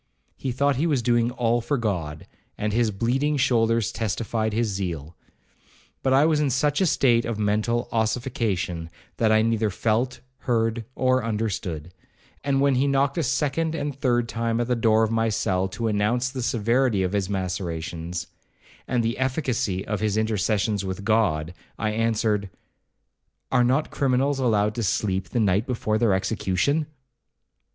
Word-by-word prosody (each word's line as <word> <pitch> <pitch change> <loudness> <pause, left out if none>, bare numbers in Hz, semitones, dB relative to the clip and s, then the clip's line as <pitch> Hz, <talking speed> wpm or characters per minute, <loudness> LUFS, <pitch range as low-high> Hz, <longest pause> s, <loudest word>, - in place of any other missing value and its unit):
He 130 - -3
thought 140 +2 +1
he 160 +5 +1
was 140 -7 +1
doing 120 -1 +2
all 120 -1 0
for 145 +5 -1
God, 85 -10 -3 0.3
and 105 0 -2
his 115 0 +2
bleeding 130 +9 0
shoulders 115 -5 +2
testified 110 +1 -2
his 115 +2 0
zeal. 85 -6 -4 0.9
But 130 - +1
I 135 +3 +5
was 155 -2 +3
in 150 -2 +2
such 145 +6 +1
a 190 - +4
state 120 -6 +3
of 115 -2 -3
mental 110 +3 0
ossification, 110 -7 -1 0.3
that 110 -1 +2
I 110 0 +4
neither 115 -1 +1
felt, 115 +6 -1 0.2
heard, 115 -1 0
or 130 -1 +2
understood; 95 -7 -3 0.5
and 135 -1 +1
when 140 -1 +4
he 130 +2 +2
knocked 140 +2 +1
a - - +2
second 150 +4 0
and 145 -2 -2
third 120 -3 +1
time 115 0 -1
at 120 - +1
the 125 +1 0
door 110 -1 +3
of 110 - 0
my 115 0 +1
cell 95 -4 0
to 115 +4 -3
announce 110 +4 +1
the 130 -1 -4
severity 115 -2 +1
of 90 +1 -2
his 100 -2 0
macerations, 85 -3 -3 0.6
and 120 -2 +1
the 115 +2 -1
efficacy 125 -8 -1
of 105 -1 -2
his 110 -1 0
intercessions 105 -1 0
with 95 +1 -4
God, 95 -7 +1 0.2
I 110 0 -1
answered, 110 -2 0 1.0
'Are 125 -2 +4
not 130 +5 +1
criminals 135 +1 +1
allowed 105 -4 +2
to 115 - -3
sleep 95 -3 -1
the 120 - -1
night 105 +2 +2
before 110 -4 -1
their 110 -5 +3
execution?' 100 - 0
115 Hz, 160 wpm, -24 LUFS, 100-125 Hz, 1.0 s, I